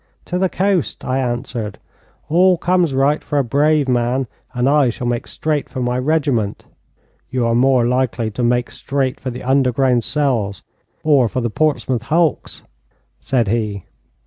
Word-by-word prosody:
'To 180 - -2
the 190 0 +2
coast,' 185 - -1
I 130 +1 0
answered. 120 -4 -3 0.5
'All 180 +3 +4
comes 175 -5 +1
right 140 +3 +2
for 145 - -2
a 140 - +3
brave 145 +3 +2
man, 125 +1 +1 0.3
and 125 0 0
I 140 -2 +4
shall 120 +1 -5
make 120 -1 -2
straight 155 -2 -2
for 130 - -6
my 125 0 0
regiment.' 135 -7 0 0.7
'You 125 -2 0
are 115 - +1
more 125 0 +3
likely 120 -2 0
to 115 - -4
make 120 0 +1
straight 135 -2 -2
for 130 - -4
the 125 0 -7
underground 130 -2 +2
cells, 120 -10 -1 0.4
or 140 -6 +4
for 130 - -2
the 120 -2 -2
Portsmouth 135 -4 0
hulks,' 160 +5 0 0.6
said 120 -5 0
he. 105 -3 -1
130 Hz, 160 wpm, -19 LUFS, 120-145 Hz, 0.7 s, All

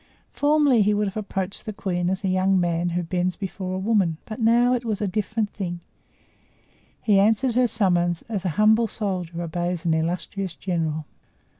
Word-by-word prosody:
Formerly 290 -5 +3
he 210 +1 +3
would 210 0 +1
have 195 - -5
approached 195 -2 -4
the 215 - -5
queen 180 -3 -1
as 190 +3 -2
a - - 0
young 185 +1 +2
man 175 0 0
who 175 +1 -1
bends 180 +1 -1
before 190 -1 -4
a - - -2
woman; 190 -5 +1
but 220 +2 -7
now 240 +2 +4
it 245 -1 -1
was 220 -4 -2
a 210 - -1
different 210 +2 -1
thing; 175 -4 -4 1.2
he 205 -3 +4
answered 225 +5 +3
her 250 +1 +3
summons 175 -6 +1
as 210 -5 -4
an 185 - 0
humble 220 +5 +4
soldier 180 -6 -3
obeys 175 +1 -3
an 165 - +3
illustrious 175 +2 -2
general. 160 -1 -2
190 Hz, 180 wpm, -24 LUFS, 175-215 Hz, 1.2 s, now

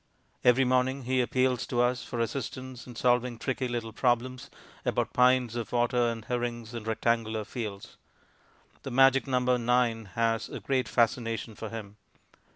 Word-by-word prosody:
Every 125 +2 +5
morning 130 +2 +1
he 130 +1 +1
appeals 125 0 +1
to 120 -1 +1
us 125 +1 +1
for 120 - -5
assistance 130 0 -4
in 120 - -10
solving 125 0 +1
tricky 130 +1 -2
little 115 -2 -4
problems 125 +1 0 0.3
about - - -1
pints 125 -2 +4
of 120 -2 -4
water 120 0 +2
and 115 -1 -5
herrings 120 -2 -3
and 115 -2 -6
rectangular 110 -1 0
fields. 105 -3 -6 0.8
The - - -6
magic 135 +2 +4
number 125 -1 +2
"9" 120 -2 +1
has 115 -1 0
a - - -6
great 130 -2 0
fascination 115 -1 0
for 110 +1 -7
him. 105 -2 -8
120 Hz, 155 wpm, -29 LUFS, 115-125 Hz, 0.8 s, Every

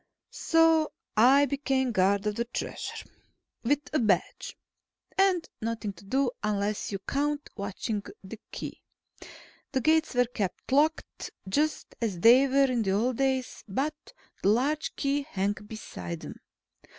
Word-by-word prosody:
So 325 -1 +3 0.2
I 265 +6 +6
became 270 -2 0
guard 195 0 +2
of 210 - +1
the 235 +3 -2
Treasure. 240 - -5 0.5
With 285 +4 0
a 310 - +3
badge. 210 -7 0 0.6
And 380 -3 +3
nothing 225 -2 -3
to 180 - -16
do 265 +4 +1
unless 210 0 -1
you 200 - -2
count 290 +8 -2
watching 205 +1 -3 0.2
the 205 +3 -9
Key. - - -7 0.9
The 260 - 0
gates 315 0 +2
were 245 0 +4
kept 215 -2 -4
locked, 305 +4 +1 0.2
just 300 +10 0
as 205 -7 -1
they 245 +8 +7
were 275 +1 +4
in 240 -2 +1
the 195 -3 +1
old 230 +4 +1
days, 265 -2 -1
but 270 +10 -1 0.5
the 195 - +3
large 280 +8 +1
Key 280 0 0
hung 200 -8 -1
beside 150 - -7
them. - - -9
245 Hz, 140 wpm, -28 LUFS, 205-285 Hz, 0.9 s, they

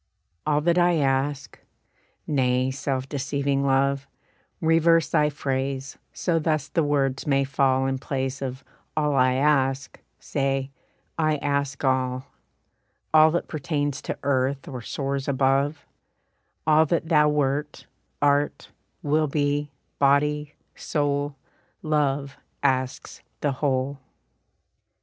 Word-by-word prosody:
"All 150 0 +2
that 170 +3 +2
I 175 0 +4
ask" 135 -2 -1 0.7
nay, 130 -2 +1
self 135 -1 -2
deceiving 140 0 -1
Love, 140 0 +1 0.5
Reverse 165 0 +3
thy 150 0 +3
phrase, 135 -1 -3
so 170 -3 0
thus 155 -1 0
the 165 - 0
words 140 -3 0
may 140 -1 +3
fall, 135 -1 +1
In 135 0 -1
place 135 0 -3
of 130 0 -5 0.3
"all 150 -1 +2
I 130 -1 +3
ask," 135 -1 +1 0.2
say, 135 -1 -1 0.5
"I 155 -1 +2
ask 140 -1 -2
all," 130 0 0 0.9
All 155 0 +7
that 170 +2 -1
pertains 145 -2 -2
to - - -4
earth 135 0 0
or 130 -3 -6
soars 135 +3 -3
above, 140 +2 +1 0.8
All 155 0 +5
that 165 +1 -1
thou 150 -2 +5
wert, 145 0 -1 0.4
art, 145 0 +1 0.3
will 155 +1 +2
be, 145 0 0 0.3
body, 150 +1 +2 0.2
soul, 145 -1 -1 0.5
Love 140 -2 0 0.3
asks 130 -2 -1 0.2
the 145 - +1
whole. 135 0 -1
140 Hz, 115 wpm, -25 LUFS, 135-150 Hz, 0.9 s, All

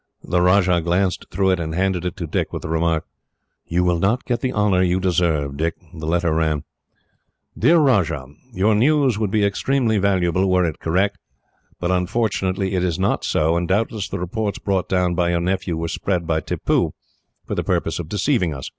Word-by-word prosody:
The 90 - 0
Rajah 90 -1 +3
glanced 90 +3 0
through 95 +1 +1
it, 90 - +1
and 80 -1 -3
handed 90 -1 0
it 90 +2 -3
to 85 - -4
Dick, 75 - -2
with - - -5
the - - -5
remark: 80 0 0 0.6
"You 90 +2 +1
will 90 -1 +1
not 110 +8 +1
get 120 -1 -1
the 130 - -1
honour 105 -5 +2
you 90 0 +2
deserve, 85 -6 0
Dick." 80 +2 -1 0.2
The 80 -2 -6
letter 85 0 +1
ran: 80 -2 0 0.9
"Dear 170 +2 +4
Rajah: 100 - +2 0.3
"Your 105 +1 +2
news 130 0 +3
would 105 -3 0
be 105 0 +2
extremely 115 +1 +1
valuable, 95 -1 +1
were 90 -1 +3
it 80 -3 -3
correct; 95 +5 0 0.6
but 90 +1 -1
unfortunately 95 0 0
it 90 -1 0
is 85 -3 0
not 95 +1 0
so, 80 +2 +1
and 85 0 0
doubtless 105 +1 -1
the - - -3
reports 100 +4 -3
brought 95 -2 -1
down 90 -1 +1
by 85 0 +1
your 85 0 +1
nephew 90 -1 -1
were 85 +1 -2
spread 90 +1 -2
by 80 -1 +1
Tippoo, - - -1 0.5
for - - -4
the - - -1
purpose - - -1
of 80 -2 -6
deceiving 105 - 0
us. 65 - -6
90 Hz, 195 wpm, -21 LUFS, 85-100 Hz, 0.9 s, Dear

